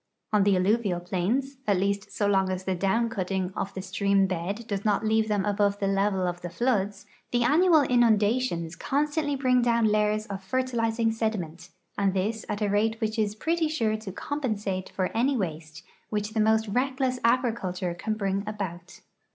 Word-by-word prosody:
On 210 - +5
the 200 -1 +4
alluvial 195 0 +1
plains 210 +10 -1
— 265 - -35
at 200 -2 +3
least 200 +2 -1
.so 205 - -1
long 195 -2 +2
as 185 0 -3
the 190 - -1
down 195 +6 +1
cutting 190 -3 -2
of 195 - -3
the 190 - -4
stream 195 +1 +2
bed 190 +5 -3
does 200 -2 -3
not 210 +1 +1
leave 220 0 +2
them 205 -2 0
above 205 -1 +1
the 200 - -2
level 195 -1 +1
of 175 0 -3
the 175 - -5
floods 205 -2 -1
— - - -38
the 240 0 +2
annual 320 +4 +5
inundations 220 -7 +2
constantly 290 - 0
bring 255 -2 +3
down 235 -1 +2
layers 215 0 +2
of 195 -2 -6
fertilizing 230 0 0
sediment, 180 -7 -3 0.3
and 195 -1 +1
this 215 +4 -1
at 210 +1 -2
a - - +2
rate 220 +3 +1
which 220 0 -2
is 210 -1 0
pretty 325 +7 0
sure 225 -8 0
to 215 -3 -6
compensate 210 -7 -3
for 185 +1 -3
any 260 +4 +2
waste 165 -3 -5 0.3
which 210 0 -2
the 225 - 0
most 220 +1 +3
reckless 255 +2 0
agriculture 230 -7 0
can 215 +5 -3
bring 195 -1 -1
about. 185 -5 -6
210 Hz, 185 wpm, -27 LUFS, 190-235 Hz, 0.3 s, On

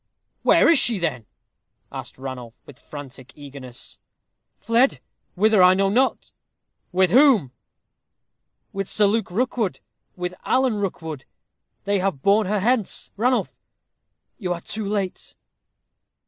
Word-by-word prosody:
"Where - - +5
is 330 -4 +6
she, 235 -3 +3
then?" 140 - -3 0.6
asked - - -8
Ranulph, 130 -3 -8
with 140 -1 -15
frantic 135 -3 -11
eagerness. 140 -4 -10 0.6
"Fled. 235 +5 +2 0.4
Whither 210 +1 +4
I 180 0 +7
know 195 0 +2
not." 255 +6 0 0.6
"With 185 -1 +2
whom?" 245 - +5 1.2
"With 195 -1 -3
Sir 210 - +3
Luke 215 +1 +1
Rookwood 225 0 -1 0.4
with 180 0 -4
Alan 255 -4 +1
Rookwood. 160 -8 -5 0.6
They 200 0 0
have 185 -8 -2
borne 205 +1 +3
her 205 0 0
hence. 230 -1 0
Ranulph, 245 +5 0 0.9
you 185 -5 -3
are 170 - -9
too 215 +4 -5
late." 200 -3 -3
195 Hz, 120 wpm, -23 LUFS, 155-220 Hz, 1.2 s, I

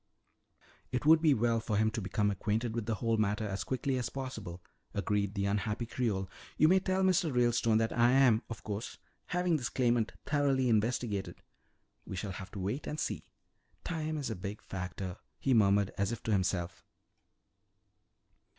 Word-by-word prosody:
"It 125 +2 -2
would 160 +1 +7
be 155 -4 +5
well 115 0 +2
for 110 -2 -1
him 110 +1 +3
to 115 0 -3
become 105 +1 0
acquainted 110 +4 -1
with 115 -2 -3
the 115 - 0
whole 115 +1 0
matter 105 0 0
as 100 0 -3
quickly 130 0 -1
as 125 - -2
possible," 110 -10 -6 0.3
agreed 100 0 0
the 100 -1 0
unhappy 105 +3 -1
Creole. 110 -6 -1 0.3
"You 155 - +6
may 190 +1 +6
tell 190 0 0
Mr. 180 -4 +3
Ralestone 120 -2 +3
that 115 0 0
I 120 0 +5
am, 125 -5 +5
of 115 - -7
course, 105 +2 -5 0.3
having 180 -2 +1
this 130 - -3
claimant 120 -3 +1
thoroughly 140 -3 +2
investigated. 110 -2 0 0.6
We - - -7
shall 95 +2 -3
have 95 +1 -7
to 100 - -5
wait 105 +10 -3
and 150 - -3
see. - - -3 0.6
Time 155 -2 -2
is 140 -5 -3
a - - -2
big 100 +3 -6
factor," 95 0 -5 0.2
he 135 - +1
murmured 100 -3 +4
as 100 +2 +1
if 115 - -5
to 110 - -1
himself. 95 -2 0
115 Hz, 175 wpm, -32 LUFS, 100-130 Hz, 0.6 s, would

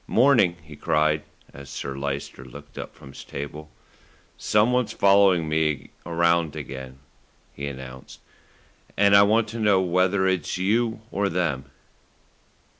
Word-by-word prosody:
"Morning," 120 -8 +4
he 75 0 -12
cried, 75 +1 +1 0.3
as 70 0 -11
Sir 70 -1 -5
Lyster 70 -2 -5
looked 65 - -13
up - - -8
from 70 -2 -14
his 70 - -11
table. 75 +2 -7 0.7
"Someone's 120 +3 +1
following 95 -4 +4
me 75 -3 -1 0.2
around 85 -2 +1
again," 65 -1 -8 0.6
he 70 - -5
announced, 65 -2 -9 0.8
"and 100 0 +5
I 100 - +8
want 110 +2 +3
to 115 +1 -6
know 105 -3 +4
whether 95 +1 +1
it's 95 -1 -1
you 110 +4 0
or 100 0 0
them." 80 -7 -1
85 Hz, 130 wpm, -24 LUFS, 70-100 Hz, 0.8 s, I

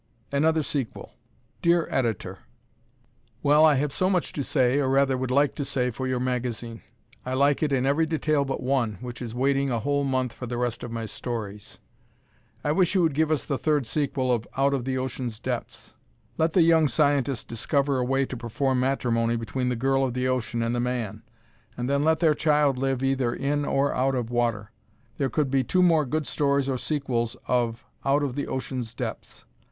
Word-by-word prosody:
Another 155 +3 +2
Sequel 135 -6 -4 0.5
Dear 170 -1 +3
Editor: 115 -6 -1 1.0
Well, 150 +2 +5
I 155 -2 +6
have 140 +1 0
so 185 - +1
much 180 -3 0
to 140 - -2
say, 130 0 +2
or 135 -2 +1
rather 135 0 +3
would 130 0 -2
like 140 +2 +3
to 145 - -3
say 130 -2 -1
for 130 +3 -4
your 130 -1 0
magazine. 120 -2 -3 0.4
I 130 +1 -3
like 140 +1 +3
it 155 -2 +1
in 130 -1 +1
every 150 +4 +2
detail 155 -2 +1
but 135 -2 -4
one, 125 -6 0
which 125 -1 -7
is 120 -1 -5
waiting 135 +2 +1
a 120 -2 0
whole 140 +2 0
month 130 -3 0
for 125 - -7
the 120 0 -3
rest 120 -1 -2
of 120 - -6
my 115 -1 -3
stories. 105 -2 -6 0.9
I 145 - +1
wish 180 +4 +2
you 185 - +4
would 160 -3 +2
give 155 +2 +1
us 155 -3 0
the 140 - -2
third 150 -4 +1
sequel 130 0 -1
of 120 -2 0
"Out 140 +1 +3
of 130 -3 -1
the 130 0 -1
Ocean's 130 -3 -4
Depths." - - -5 0.4
Let 160 0 +1
the 180 - +5
young 160 -2 +5
scientist 140 -4 +1
discover 140 +4 0
a - - +1
way 135 +2 +1
to 130 - -6
perform 125 +3 -1
matrimony 120 -3 +1
between 125 +3 -2
the 125 - 0
girl 135 +3 +1
of 125 -2 -1
the 125 0 0
ocean 120 -2 -1
and 115 +1 -1
the 120 - 0
man, 120 -4 -2 0.6
and 120 0 -2
then 140 +1 +1
let 160 +1 +3
their 160 -3 +5
child 150 -3 +2
live 135 0 -1
either 135 -3 +1
in 145 +1 -1
or 140 +1 +1
out 135 +1 +1
of 120 -2 -3
water. 115 -3 -1 0.5
There 135 -2 +1
could 140 +1 0
be 135 -1 +2
two 180 +8 +2
more 160 -5 +4
good 155 +3 -1
stories 140 +1 +1
or 130 -2 -1
sequels 125 -6 -2
of 120 -2 0 0.2
"Out 140 +2 +2
of 135 -3 -1
the 145 +2 -3
Ocean's 130 -3 -4
Depths." - - -6
135 Hz, 205 wpm, -26 LUFS, 125-145 Hz, 1.0 s, I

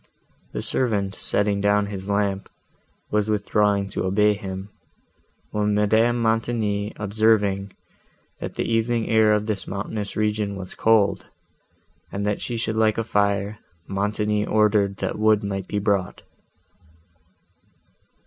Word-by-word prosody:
The - - -4
servant, 105 -6 +2
setting 100 0 +1
down 105 0 +3
his 100 -1 -6
lamp, 100 -1 -1 0.6
was 105 0 +1
withdrawing 105 -1 +1
to - - -3
obey 105 +3 +3
him, 95 0 -7 0.8
when 105 0 0
Madame 110 +3 +3
Montoni 110 -2 0
observing, 105 -2 +1 0.7
that - - -6
the - - -1
evening 115 0 0
air 110 -1 +4
of 105 0 +1
this 105 -3 -2
mountainous 100 +1 -4
region 105 -1 0
was 95 -2 -6
cold, 105 -4 +2 0.8
and 100 +1 -3
that 105 0 -1
she 120 - -3
should 110 -1 -2
like 110 -1 +2
a 115 - 0
fire, 100 -1 0 0.3
Montoni 105 +1 -1
ordered 105 -2 +2
that - - -3
wood 110 0 +3
might 95 -2 -3
be 105 - -3
brought. 100 -2 -1
105 Hz, 130 wpm, -23 LUFS, 100-110 Hz, 0.8 s, air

